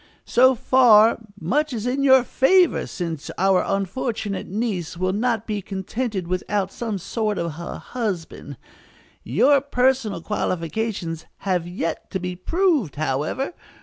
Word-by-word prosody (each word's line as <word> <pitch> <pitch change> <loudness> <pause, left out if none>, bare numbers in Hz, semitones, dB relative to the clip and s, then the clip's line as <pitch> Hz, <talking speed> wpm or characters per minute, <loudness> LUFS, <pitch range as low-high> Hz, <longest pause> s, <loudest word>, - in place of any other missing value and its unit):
So 260 +2 +5
far, 230 -3 +5 0.2
much 275 - 0
is 225 -1 -4
in 260 +3 0
your 265 -2 +6
favor, 350 +8 +3
since 165 -4 -5
our 190 0 +3
unfortunate 200 +1 -2
niece 195 -5 -3
will 185 +1 0
not 225 0 0
be 210 -2 -3
contented 195 +1 -3
without 190 +2 -1
some 225 -4 -3
sort 210 +3 -2
of 170 -2 -3
a 170 - -6
husband. 205 -10 -5 0.7
Your 280 0 +4
personal 255 -7 +1
qualifications 180 -3 -3 0.2
have 180 -3 0
yet 175 -2 -4
to 190 - -3
be 180 0 -4
proved, 305 - +1
however. 155 - -2
210 Hz, 130 wpm, -23 LUFS, 180-250 Hz, 0.7 s, your